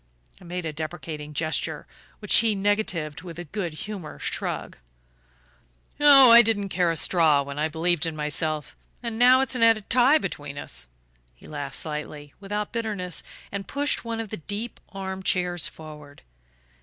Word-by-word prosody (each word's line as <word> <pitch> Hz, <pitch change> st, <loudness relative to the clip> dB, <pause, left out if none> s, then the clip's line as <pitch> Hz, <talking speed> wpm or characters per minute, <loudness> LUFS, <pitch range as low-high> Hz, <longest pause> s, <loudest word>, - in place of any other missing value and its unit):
I -, -, -13 dB
made 175 Hz, 0 st, -5 dB
a 155 Hz, -, -3 dB
deprecating 155 Hz, -1 st, -6 dB
gesture, 155 Hz, +1 st, -1 dB, 0.3 s
which 210 Hz, -, +3 dB
he 220 Hz, -2 st, +3 dB
negatived 195 Hz, -7 st, 0 dB
with 170 Hz, -2 st, -9 dB
a 175 Hz, -, -5 dB
good 175 Hz, 0 st, -4 dB
humoured 195 Hz, -8 st, -7 dB
shrug. -, -, -3 dB, 1.2 s
"Oh, 275 Hz, -4 st, +8 dB
I 235 Hz, +1 st, +11 dB
didn't 210 Hz, -3 st, 0 dB
care 180 Hz, -2 st, +1 dB
a 165 Hz, -, 0 dB
straw 155 Hz, -3 st, +3 dB
when 140 Hz, +1 st, -7 dB
I 155 Hz, -, +2 dB
believed 165 Hz, +1 st, 0 dB
in 160 Hz, -, -4 dB
myself 150 Hz, 0 st, -1 dB, 0.3 s
and 230 Hz, -1 st, -3 dB
now 255 Hz, +2 st, +7 dB
it's 270 Hz, -, 0 dB
an 250 Hz, -, -2 dB
added 225 Hz, -2 st, +3 dB
tie 255 Hz, +5 st, +6 dB
between 145 Hz, -, -5 dB
us!" 65 Hz, -, -6 dB, 0.5 s
He -, -, -16 dB
laughed 145 Hz, -3 st, -5 dB
slightly, 150 Hz, -2 st, -5 dB
without 205 Hz, +1 st, -4 dB
bitterness, 210 Hz, -6 st, -3 dB, 0.3 s
and 195 Hz, -1 st, -5 dB
pushed 285 Hz, +5 st, -1 dB
one 230 Hz, -1 st, -4 dB
of 225 Hz, -2 st, -4 dB
the 215 Hz, -, -5 dB
deep 205 Hz, +8 st, -5 dB
arm 190 Hz, -1 st, -5 dB
chairs 180 Hz, -2 st, 0 dB
forward. 150 Hz, -2 st, -12 dB
180 Hz, 165 wpm, -25 LUFS, 155-215 Hz, 1.2 s, I